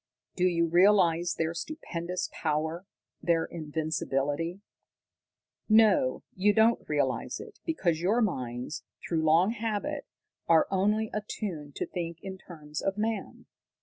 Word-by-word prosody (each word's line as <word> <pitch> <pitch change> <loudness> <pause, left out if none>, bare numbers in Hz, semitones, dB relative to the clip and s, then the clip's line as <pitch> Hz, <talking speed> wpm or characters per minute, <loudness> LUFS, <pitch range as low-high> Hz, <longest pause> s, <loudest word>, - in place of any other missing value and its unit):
Do 180 - +2
you 170 -2 +3
realize 175 -1 +4
their 165 0 -1
stupendous 180 - -4
power, 160 +4 -2 0.3
their 165 -1 +2
invincibility? 155 +1 -2 1.1
"No, 215 -12 +4
you 205 +3 +3
don't 225 +2 +4
realize 140 -4 0
it, - - -11
because 175 - 0
your 205 +7 +2
minds, 125 - -2 0.2
through 165 -2 0
long 165 +6 +4
habit, 230 +6 -3 0.4
are 165 -1 +5
only 210 +3 +1
attuned 185 -8 -4
to - - -2
think 170 -2 -4
in 190 -1 -6
terms 150 -5 -7
of 195 +1 -1
man. 220 +1 -3
175 Hz, 120 wpm, -29 LUFS, 160-210 Hz, 1.1 s, are